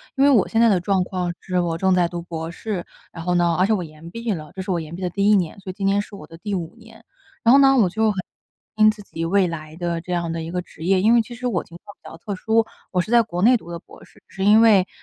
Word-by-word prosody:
因 275 - +2
为 285 - +6
我 240 -8 +4
现 225 - +1
在 230 - +6
的 195 -4 +3
状 185 +1 +1
况 180 -2 -3
是 180 -1 -2
我 170 -2 -1
正 190 0 +3
在 175 -1 +3
读 175 0 -6
博 165 -1 -6
士， 190 0 -5 0.3
然 165 - -8
后 180 - +1
呢 175 -1 +2
而 185 - +3
且 220 - +2
我 185 - -1
延 160 +1 -12
毕 230 +1 -4
了， 155 -6 -5
这 190 - -6
是 185 - -8
我 180 -2 +1
延 160 0 -7
毕 185 - -9
的 180 - -1
第 200 +3 +2
1 - - +6
年， 180 -1 -1
所 190 -1 -7
以 - - -12
今 195 0 -2
年 200 +1 +2
是 210 - -12
我 150 -6 -11
的 165 - -13
第 205 +3 -5
5 175 +2 -4
年， 225 0 -17 0.4
然 235 - +5
后 270 - +8
呢 270 -1 +6
我 205 -7 +4
就 220 +3 +1
很 200 - -7 0.6
担 215 - +2
心 215 - +7
自 215 -1 -12
己 165 -3 -5
未 190 +2 +2
来 155 -2 -7
的 170 -1 -3
这 180 +1 -5
样 170 -1 -1
的 165 0 -4
一 165 - -6
个 180 0 -2
职 160 -2 -13
业。 190 0 +3
因 220 +4 +4
为 235 - +5
其 240 +2 -11
实 250 +2 -4
我 195 -8 -1
情 170 - -13
况 205 - -13
比 - - -13
较 - - -11
特 200 +4 -5
殊， 225 +4 +1 0.3
我 180 - +1
是 195 - -7
在 240 -1 +6
国 175 -5 -5
内 245 +3 +6
读 170 -6 -12
的 170 - -5
博 - - -17
士， - - -23
是 195 - -4
因 210 +2 +6
为， 205 -5 +5
185 Hz, 335 characters per minute, -22 LUFS, 170-215 Hz, 0.6 s, 后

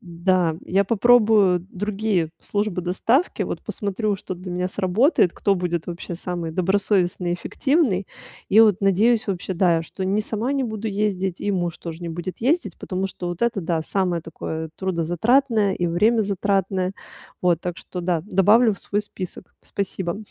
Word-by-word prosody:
да, 175 -1 0
я 195 +2 +3
попробую 215 -4 +4
другие 200 -3 -1
службы 205 -3 -2
доставки, 225 - +1
вот, - - -4
посмотрю, 205 0 -2
что 185 - -6
для 180 +1 -8
меня 180 +1 -1
сработает, 190 - +2
кто 200 - +1
будет 175 -3 -2
вообще 175 0 -6
самый 175 -1 -4
добросовестный, 185 0 +1
эффективный, 240 - 0 0.4
и 210 - +5
вот 210 -4 +5
надеюсь 215 +4 +3
вообще, 190 0 -3
да, 170 -2 +3
что 190 +4 -6
не 195 +3 +1
сама 220 +4 -2
не 275 -1 0
буду 220 -1 -4
ездить 195 -3 -1
и 205 - -1
муж 175 -3 -2
тоже 165 0 -7
не 170 - -4
будет 175 +3 -6
ездить. 305 +9 0
Потому 190 +1 -3
что 180 -2 -6
вот 175 -1 -5
это, 235 -3 +1
да, 165 -1 -1
самое 180 0 0
такое 160 0 -6
трудозатратное 195 - +1
и 175 - -1
времязатратное, 195 -1 +1 0.5
вот, 175 -2 +2
так 175 -1 -3
что, 180 - -7
да, 175 -2 0
добавлю 210 +3 +4
в - - -14
свой 205 - -1
список. 190 -3 -8
Спасибо. 190 -3 -3
190 Hz, 160 wpm, -23 LUFS, 175-210 Hz, 0.5 s, и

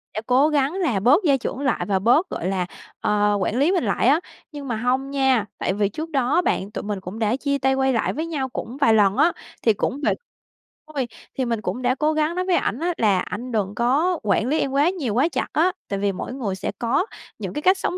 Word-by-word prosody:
sẽ 215 - -2
cố 265 +5 +4
gắng 290 +1 +1
là 325 - 0
bớt 285 - +4
gia 280 -3 +4
trưởng 255 - -4
lại 265 -4 0
và 195 -2 +1
bớt, 245 - +3
gọi 180 - -3
là, 185 -2 0 0.3
ờ, 210 0 +2
quản 210 +6 0
lý 310 +6 +4
mình 360 -8 +1
lại 215 +3 +1
á. 295 +5 +5 0.3
Nhưng 285 -2 -7
mà 235 - -1
hông 255 +4 0
nha, 265 -6 +2
tại 185 - -1
vì 205 0 +1
trước 315 +9 -6
đó 270 -1 +1
á 355 - +4
bạn, 200 - -1
tụi - - -5
mình 205 -2 -3
cũng 190 +5 -8
đã 220 +2 +1
chia 280 +1 -1
tay, 265 0 +2
quay 265 0 +2
lại 225 - 0
với 315 +3 -3
nhau 280 -5 -3
cũng 245 +2 -6
vài 230 -6 +4
lần 205 0 +4
á, 330 +4 +5 0.3
thì 225 - +4
cũng 275 +7 -2
vậy - - +2 0.8
thôi, 265 -4 -1 0.3
thì 260 - 0
mình 230 -2 -1
cũng 250 - -3
đã 250 +1 +2
cố 305 +3 +1
gắng 310 +2 0
nói 365 0 -1
với 365 -2 +2
ảnh 240 -3 0
á 350 +1 0
là: 200 -4 +3
"Anh 240 +7 -5
đừng 205 -3 -1
có 300 +9 +2
quản 210 +3 +1
lý 305 +4 +1
em 270 - 0
quá 285 +5 +3
nhiều, 290 - -3
quá 275 +8 +3
chặt - - -1
á, 350 +4 +3 0.2
tại 200 -1 -2
vì 200 0 +1
mỗi 195 +6 -6
người 215 -8 -3
sẽ 190 - -3
có 265 - +1 0.3
những - - -5
cái 295 - -3
cách 375 +3 +4
sống 365 -1 -2
260 Hz, 260 wpm, -23 LUFS, 215-300 Hz, 0.8 s, á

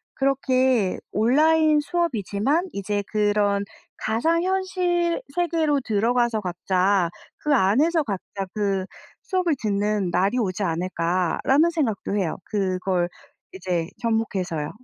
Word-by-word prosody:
그렇게 260 -6 +1
'온라인 305 +7 +4
수업이지만 295 - 0
이제 205 +1 -2
그런 205 -1 +1 0.3
가상현실 345 - 0
세계로 325 -4 +1
들어가서 230 +1 +1
각자 185 0 +1 0.3
그 300 - +1
안에서 285 - +3
각자 195 -3 -5
그 195 -3 -1 0.4
수업을 365 -5 0
듣는 205 -3 0
날이 195 +7 +1
오지 200 -3 -1
않을까?'라는 180 - +1
생각도 235 - -1
해요. 180 -6 -1
그걸 185 -3 0 0.5
이제 175 -3 -2
접목해서요. 195 -9 -1
215 Hz, 255 characters per minute, -24 LUFS, 190-300 Hz, 0.5 s, 온라인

